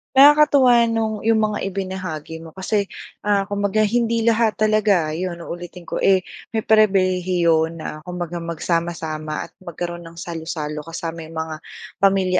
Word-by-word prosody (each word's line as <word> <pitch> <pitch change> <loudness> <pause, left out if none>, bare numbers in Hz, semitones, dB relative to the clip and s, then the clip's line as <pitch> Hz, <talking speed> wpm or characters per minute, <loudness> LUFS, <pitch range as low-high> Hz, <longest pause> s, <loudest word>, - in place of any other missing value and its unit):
Nakakatuwa 275 -4 +7
nung 220 -1 -1
yung 220 +1 +2
mga 210 - -3
ibinahagi 185 -5 -5
mo 160 -1 -12
kasi 200 +1 0 0.4
ah 200 -1 +3
kumbaga 205 +1 0
hindi 230 +1 +1
lahat 230 -1 +3
talaga 210 -7 +2
yun 175 +2 -3
uulitin 175 +1 -8
ko - - -4
eh 190 -1 +4 0.3
may 220 - 0
pribilehiyo 185 -6 +3
na 160 -2 -7
kumbaga 175 -1 -4
magsama-sama 165 -2 -2
at - - -35
magkaroon 175 -1 -6
ng 165 - -13
salo-salo 160 -3 -4
kasama 165 -1 -5
mga 160 0 -4 0.4
pamilya 190 -2 +3
185 Hz, 135 wpm, -21 LUFS, 165-215 Hz, 0.4 s, Nakakatuwa